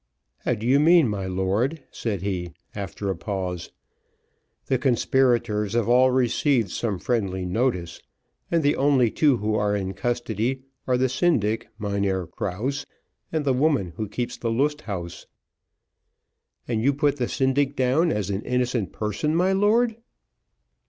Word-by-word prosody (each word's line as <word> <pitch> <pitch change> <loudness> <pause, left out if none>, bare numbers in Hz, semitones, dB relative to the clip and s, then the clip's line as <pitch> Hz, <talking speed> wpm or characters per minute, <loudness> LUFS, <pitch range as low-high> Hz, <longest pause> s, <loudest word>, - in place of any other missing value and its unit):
"How - - 0
do 110 - -6
you 135 +3 +4
mean, 165 -1 +6
my 100 -3 -3
lord?" 100 - -1
said 100 -6 -3
he, 90 -4 -3 0.2
after 100 0 -4
a - - -3
pause. 90 -1 -4 1.0
"The 130 - +1
conspirators 120 -5 +2
have 120 -2 +1
all 125 +2 +5
received 125 -3 +2
some 105 -5 -2
friendly 95 -4 -1
notice, 90 -4 -1 0.5
and 165 -2 +1
the 145 +1 +3
only 135 -5 +3
two 145 -5 +3
who 105 +1 -1
are 105 -1 +1
in 95 -1 -2
custody 120 +2 -2 0.2
are 125 -1 +3
the 130 +1 +2
syndic, 115 -6 +1
Mynheer 100 -3 -1
Krause, 105 - -3 0.4
and 155 -2 -1
the 135 - +3
woman 130 - +1
who 110 +1 -4
keeps 120 +3 -3
the 115 - -2
Lust 145 +6 0
Haus." 85 -4 -6 1.4
"And 115 -2 -1
you 140 +4 +2
put 145 -1 +1
the 125 -3 -1
syndic 135 +1 +1
down 135 +7 +2
as 100 -2 -1
an 100 +1 -2
innocent 125 -4 -1
person, 110 +9 -2
my 185 +3 +3
lord?" 220 +4 +3
120 Hz, 150 wpm, -24 LUFS, 100-135 Hz, 1.4 s, mean